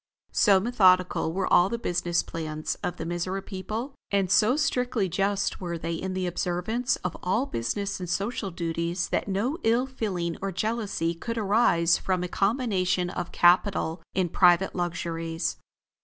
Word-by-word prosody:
So 195 -2 +5
methodical 185 -7 +3
were 190 +3 -1
all 180 +2 +6
the 235 - -2
business 175 -6 0
plans 155 -2 -4
of 180 - -3
the - - -4
Mizora 175 +3 -3
people, 215 +7 -5 0.2
and 195 -2 +1
so 220 +7 +4
strictly 250 -8 0
just 195 +2 -1
were 170 -2 -3
they 165 +1 -3
in 185 +3 -4
the 185 -1 -1
observance 180 +8 -1
of 180 - -2
all 195 +9 +1
business 195 - -3
and 180 -2 -5
social 200 +3 -2
duties 170 0 -2
that - - -1
no 220 - -1
ill 235 +3 +2
feeling 190 -10 -3
or 195 0 -2
jealousy 205 -4 -1
could 230 +8 -5
arise 195 -6 +3
from 185 -1 -1
a - - -2
combination 190 -4 0
of 175 -2 -4
capital 175 -1 +3
in 185 -2 +1
private 180 +2 +4
luxuries. 165 -1 -3
185 Hz, 155 wpm, -26 LUFS, 175-210 Hz, 0.2 s, all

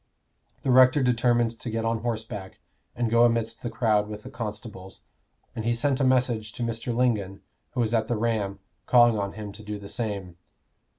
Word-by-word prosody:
The 130 - +1
rector 130 +2 +6
determined 120 -1 +2
to 120 - -5
get 115 0 -2
on 115 0 0
horseback 110 -4 -5 0.4
and 120 -1 0
go 115 +1 +4
amidst 115 -1 +1
the 120 - -3
crowd 110 -3 +1
with 105 0 -8
the - - -9
constables; 105 -4 -7 0.5
and 110 - -3
he 120 +1 +1
sent 135 +3 +1
a - - +2
message 120 -5 +1
to 120 - -4
Mr. 115 +1 -3
Lingon, 110 -6 0 0.3
who 125 - 0
was 115 0 0
at 110 -1 +1
the 120 - 0
Ram, 105 -3 -1 0.3
calling 120 -3 +5
on 100 -1 -3
him 105 -2 -7
to 105 +2 -11
do 105 0 -5
the 100 -1 -9
same. 100 -7 -4
115 Hz, 190 wpm, -26 LUFS, 105-120 Hz, 0.5 s, rector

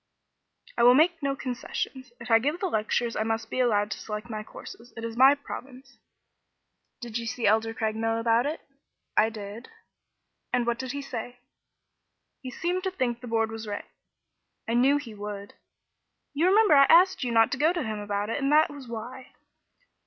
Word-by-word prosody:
"I - - +4
will 245 +1 +7
make 325 +3 +3
no 275 -1 -1
concessions. 260 0 -5
If 235 - -7
I 225 - +7
give 295 +8 -1
the 390 - -2
lectures, 230 - -1
I - - -1
must 225 0 -2
be - - -2
allowed 210 -4 +2
to - - -4
select 210 +2 -6
my 215 -1 -4
courses. 230 +2 -12
It 225 - -6
is 230 0 -5
my 265 +3 +7
province." 270 -2 -10 1.0
"Did 235 -1 -4
you 230 - -5
see 230 +1 -3
Elder 220 +2 +3
Craigmile 225 +1 -1
about 230 +3 +2
it?" 310 +2 -4 0.5
"I 220 - +4
did." 215 +2 -9 0.8
"And 245 -1 +1
what 235 0 -1
did 260 -1 -4
he 280 0 -4
say?" 245 -2 -6 1.0
"He 260 - -6
seemed 350 +8 -2
to - - +1
think 255 -10 -2
the 250 - -8
Board 225 -1 0
was 225 0 -7
right." 205 -1 -5 0.8
"I 230 - -1
knew 265 +4 +4
he 255 -7 -7
would. 205 -1 -7 0.8
You 310 +5 +2
remember 410 -1 +5
I 275 -1 +7
asked 360 +2 +5
you 250 - -1
not 225 -1 +4
to 270 - -2
go 310 +3 +4
to 350 -3 -2
him 215 -2 -4
about 205 +1 -3
it, 280 - -2
and 275 +1 +1
that 305 0 +5
was 280 -3 -10
why." 245 +3 -8
240 Hz, 190 wpm, -27 LUFS, 225-275 Hz, 1.0 s, will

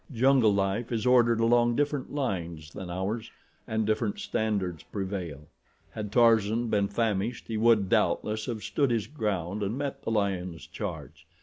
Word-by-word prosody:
Jungle 130 -2 +4
life 100 +4 0
is 115 0 -1
ordered 120 -2 +4
along 120 +1 +3
different 145 -1 -1
lines 85 - -3
than 95 -2 -7
ours 95 +6 -3 0.4
and 110 0 0
different 110 0 0
standards 100 -7 -1
prevail. 95 -7 -5 0.5
Had 105 -2 -5
Tarzan 115 0 +3
been 100 -2 +2
famished 105 +1 -1
he 115 - -3
would, 110 -3 +4
doubtless, 105 +3 +1
have 110 -4 -4
stood 140 +6 +1
his 115 -3 0
ground 105 - -3
and 105 +5 -2
met 140 -1 -3
the - - -4
lion's 95 -6 -1
charge. - - -7
110 Hz, 150 wpm, -28 LUFS, 95-120 Hz, 0.5 s, Jungle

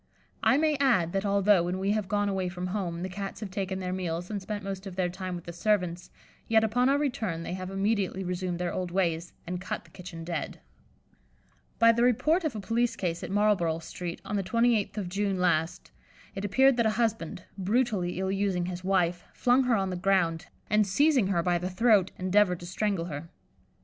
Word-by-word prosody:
I 270 - +4
may 305 -1 +2
add, 235 -12 +2
that 195 +1 0
although, 200 -1 +4
when 175 +2 -2
we 195 +2 0
have 210 -2 -1
gone 205 0 +1
away 190 -2 -1
from 180 0 -5
home, 180 -3 -3
the - - -2
Cats 195 +1 -6
have 210 -4 -6
taken 190 -1 -2
their 185 -1 -3
meals 175 0 -3
and 205 -2 -3
spent 205 +1 -5
most 195 0 -5
of 185 - -8
their 180 -1 0
time 185 0 -5
with 175 - -7
the 170 - -8
servants, 180 -2 0 0.4
yet 225 0 +4
upon 245 +4 +2
our 280 - +4
return 220 - -2
they 170 - -4
have 185 0 -5
immediately 195 -1 0
resumed 180 -1 -2
their 175 0 -2
old 180 -1 -2
ways, 170 -2 -1
and 180 +1 -4
cut 185 - -4
the - - -21
kitchen 180 -3 -9
dead. 170 0 -4 1.2
By 230 0 +7
the 230 +1 0
report 305 +9 +3
of 305 -7 -2
a - - -3
police 230 +4 0
case 170 -2 -3
at - - -5
Marlborough 195 -5 +2
Street, 170 +1 -6
on 205 - -2
the 195 - 0
28th 230 +1 +1
of 200 -4 -2
June 195 +1 -1
last, 175 0 0 0.4
it 195 - -5
appeared 260 +6 +4
that 235 -2 +3
a 215 0 -1
husband, 225 -8 -1
brutally 200 -3 0
ill 190 0 -1
using 195 -3 0
his 180 0 -5
wife, 180 -2 +1
flung 250 +2 +3
her 245 -2 +3
on 195 -2 0
the - - -2
ground, 180 -3 +1 0.2
and 210 -1 +3
seizing 265 +1 +3
her 175 -4 +1
by 175 0 +1
the 180 +1 -3
throat, 200 -1 +4
endeavoured 185 -1 +2
to - - -7
strangle 185 -1 -1
her. 160 0 -6
190 Hz, 210 wpm, -28 LUFS, 180-215 Hz, 1.2 s, By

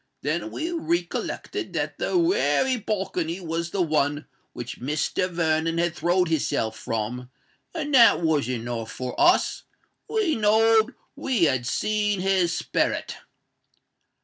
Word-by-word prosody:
Then - - -1
we 330 +2 -4
recollected 175 - -3
that - - -3
that - - 0
wery 340 - +2
balcony 190 -5 -2
was 170 -1 -3
the 190 -1 0
one 150 -2 0 0.3
which 120 0 -7
Mr. 150 +7 -1
Vernon 165 -1 0
had 170 0 0
throwed 175 +2 +1
his 160 -3 0
self 110 0 -1
from; 115 +3 -4 0.5
and 295 -3 -3
that 240 -3 +7
was 155 -6 +1
enow 120 -2 -3
for 125 +3 -6
us. 350 +1 +3 0.5
We 430 -7 +1
knowed 225 +2 +3 0.2
we 260 -8 0
had 130 -6 +2
seen 210 - 0
his 185 -2 +2
sperret!" - - -1
175 Hz, 130 wpm, -25 LUFS, 150-220 Hz, 0.5 s, that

